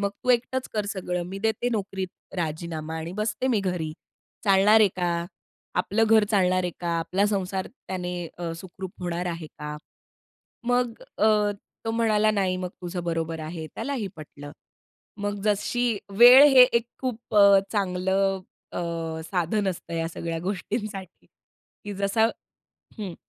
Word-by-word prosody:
मग 200 0 0
तू 250 - +3
एकटंच 250 +1 +1
कर 210 -2 -1
सगळं, 180 -3 -2
मी 190 +2 -6
देते 220 +3 0
नोकरीत 195 -3 -2 0.3
राजीनामा 160 -1 -3
आणि 160 +2 -5
बसते 215 +4 -1
मी 220 -5 +2
घरी, 180 -5 -2 0.5
चालणार 200 +2 +6
आहे 210 - +6
का? 170 -2 0 0.5
आपलं 205 +5 +2
घर 220 -1 +5
चालणार 185 -3 +3
आहे 180 - -1
का? 175 - -3
आपला 185 +5 +1
संसार 190 -2 -1
त्याने 180 -7 -6 0.2
अ, 170 -1 -3
सुखरूप 185 +1 -8
होणार 175 0 -2
आहे 170 -2 -4
का? 150 0 -7 0.9
मग 245 -1 +2 0.3
अ, 215 - +4 0.6
तो 225 - -1
म्हणाला, 215 -2 +3
"नाही, 190 -3 +1
मग 185 0 -3
तुझं 175 0 -4
बरोबर 165 -1 -2
आहे." 160 0 -6
त्यालाही 270 -7 -3
पटलं. 145 -1 -10 0.7
मग 205 0 -2
जशी, 220 +2 +1 0.2
वेळ 245 +3 +10
हे 255 -1 +10
एक 235 -2 +3
खूप 245 -4 -4
अ, 200 -1 +8
चांगलं 190 0 +1 0.3
अ, - - -3 0.4
साधन 190 +3 0
असतं 170 -2 -5
ह्या 165 0 -1
सगळ्या 165 0 -4
गोष्टींसाठी 195 +1 -4
की 205 - -14
जसं 200 +4 +2 0.7
हं. 195 -5 -5
195 Hz, 145 wpm, -26 LUFS, 175-215 Hz, 0.9 s, वेळ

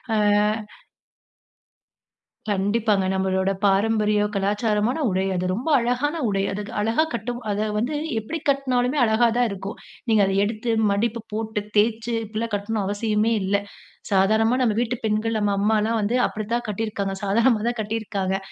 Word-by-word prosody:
ஆ. - - +2 2.3
கண்டிப்பாங்க. 205 0 +1
நம்பளோட 190 0 0
பாரம்பரிய 210 +1 +2
கலாச்சாரமான 210 +5 0
உடை. 190 +1 0
அது 180 +1 -1
ரொம்ப 250 +10 -3
அழகான 250 +6 0
உடை. 195 -1 0
அது 205 +2 -3 0.2
அழகா 225 +9 +2
கட்டும் 240 +2 -3
அத 210 +2 -1
வந்து 250 +8 -1 0.2
எப்பிடி 315 +10 -5
கட்னாலுமே 260 0 +1
அழகா 225 +2 +3
தான் 245 -1 +3
இருக்கும். 195 +1 -6 0.3
நீங்க 215 -2 +4
அத 195 - 0
எடுத்து 225 +2 -2 0.2
மடிப்பு 230 +3 0
போட்டு, 220 -1 -2 0.2
தேய்ச்சு 230 +2 +1
இப்பிடிலாம் 220 +1 -4
கட்ணும் 205 +1 -2
அவசியமே 210 +2 0
இல்ல. 195 +2 0 0.6
சாதாரணமா 220 +5 +3
நம்ப 225 -4 +2
வீட்டு 245 +1 -1
பெண்கள், 220 +1 0
நம்ப 205 -1 +1
அம்மாலாம் 220 +2 +1
வந்து 215 +5 0
அப்பிடித்தான் 230 +3 -3
கட்டியிருக்காங்க. 205 -2 -2
சாதாரணமா 225 +2 +3
தான் 240 -2 -4
கட்டியிருக்காங்க. 205 -3 -2
215 Hz, 135 wpm, -23 LUFS, 205-230 Hz, 2.3 s, நீங்க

